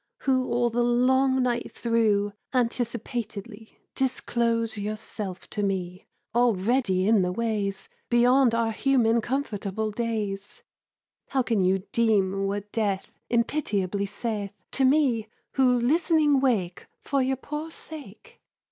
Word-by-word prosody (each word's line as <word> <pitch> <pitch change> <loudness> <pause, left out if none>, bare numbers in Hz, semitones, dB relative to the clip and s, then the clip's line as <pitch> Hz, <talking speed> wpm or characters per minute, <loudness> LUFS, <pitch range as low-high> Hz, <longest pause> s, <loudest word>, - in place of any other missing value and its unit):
Who 260 -1 +2
all 240 0 +1
the 240 +1 +1
long 260 +2 +3
night 240 -1 -1
through 215 -3 +1 0.2
Anticipatedly 235 -2 -3 0.2
Disclose 235 -3 0
yourself 210 -2 -5
to 210 - -2
me 185 -2 -3 0.3
Already 225 -3 +2
in 220 -2 +5
the 180 0 0
ways 205 -2 -2 0.2
Beyond 245 0 +4
our 230 -1 +1
human 235 -2 +2
comfortable 220 -4 -2
days; 210 -3 -3 0.6
How 265 -2 +1
can 225 -5 +1
you 190 +1 +2
deem 195 -4 +2
what 205 +1 -4
Death 200 -4 -2
Impitiably 210 -6 0
saith 205 -1 -4 0.2
To 270 - +2
me, 260 -6 +3 0.2
who 260 -2 +3
listening 295 +3 +3
wake 210 -10 0 0.2
For 275 -1 +1
your 260 +1 0
poor 300 +4 -5
sake? 295 -10 -10
230 Hz, 120 wpm, -26 LUFS, 205-255 Hz, 0.6 s, in